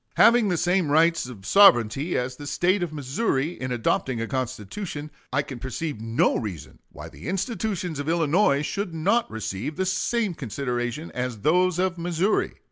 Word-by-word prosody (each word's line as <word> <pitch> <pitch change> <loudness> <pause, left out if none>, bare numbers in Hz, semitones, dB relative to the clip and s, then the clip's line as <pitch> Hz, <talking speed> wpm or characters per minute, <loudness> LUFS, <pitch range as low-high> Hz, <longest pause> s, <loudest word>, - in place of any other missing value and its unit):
Having 235 -2 +5
the 175 - +1
same 175 -1 +1
rights 165 -1 +3
of 105 -7 -11
sovereignty 140 - +5
as 125 +1 -2
the 145 +2 -9
State 185 +6 +1
of 175 -3 -2
Missouri 145 - -1
in 130 -1 -3
adopting 120 +1 0
a 115 - -1
constitution, 130 - -5 0.2
I 140 +2 +1
can 135 -3 -8
perceive 130 0 -4
no 115 +1 +1
reason 95 - -6
why - - -9
the - - -11
institutions 190 - -2
of 145 +2 -3
Illinois 160 -2 +2
should 195 -1 -3
not 200 +9 +1
receive 110 +6 -4
the 190 - -1
same 200 +2 0
consideration 125 +1 -4
as 125 -4 -4
those 180 - +3
of 180 -1 0
Missouri.... 175 +4 0
155 Hz, 165 wpm, -25 LUFS, 125-180 Hz, 0.2 s, Having